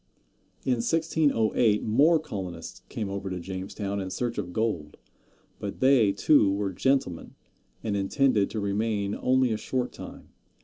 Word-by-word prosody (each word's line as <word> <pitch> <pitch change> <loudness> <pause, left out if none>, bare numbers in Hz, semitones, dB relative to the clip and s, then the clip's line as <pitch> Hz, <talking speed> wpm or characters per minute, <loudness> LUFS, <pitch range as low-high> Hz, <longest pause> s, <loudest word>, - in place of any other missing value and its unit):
In 125 -2 +2
1608 120 -7 +2
more 145 +10 +4
colonists 95 - -7
came 110 -4 -3
over 100 0 -4
to 90 -1 -4
Jamestown 95 +2 -4
in 95 - -4
search 120 +5 -2
of 90 -3 -4
gold; 90 -8 -2 0.6
but 100 - -5
they, 130 -6 +5
too, 100 +1 +4
were 100 -1 -1
gentlemen, 130 -7 0 0.5
and 105 -2 -1
intended 105 +2 +2
to 110 - -4
remain 100 0 -1
only 130 0 +2
a - - -1
short 125 +3 -2
time. - - -10
105 Hz, 140 wpm, -27 LUFS, 95-125 Hz, 0.6 s, they